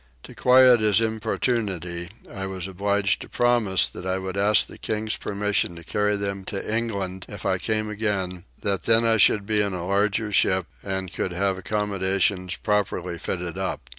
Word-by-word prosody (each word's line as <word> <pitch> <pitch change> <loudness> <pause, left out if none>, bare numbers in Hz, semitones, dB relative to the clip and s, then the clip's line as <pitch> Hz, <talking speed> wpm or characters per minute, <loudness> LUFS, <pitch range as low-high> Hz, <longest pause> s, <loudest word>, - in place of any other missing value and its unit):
To - - -11
quiet 125 -1 +6
his 110 0 +4
importunity 105 -6 -2 0.2
I 95 0 -5
was 95 -1 -5
obliged 100 +1 0
to - - -9
promise 120 -6 +2
that - - -9
I 95 0 -1
would 95 0 -5
ask 100 +2 +4
the - - -13
king's 110 0 -2
permission 100 -3 -1
to 85 - -10
carry 105 +4 0
them 100 -1 -3
to 105 +3 -3
England 100 -5 -3
if 100 -2 -9
I 95 -2 +1
came 110 +1 -1
again; 100 -4 -2 0.2
that 100 -4 0
then 115 0 +4
I 115 -1 +5
should 105 0 +4
be 105 0 +2
in 100 -2 -1
a 85 -1 -4
larger 105 +3 0
ship 95 -2 +2 0.2
an 95 -1 -3
could 95 -1 -3
have 95 +1 0
accommodations 95 -2 0
properly 90 -5 -1
fitted 90 +1 -3
up. 80 -9 -4
100 Hz, 175 wpm, -24 LUFS, 95-105 Hz, 0.2 s, quiet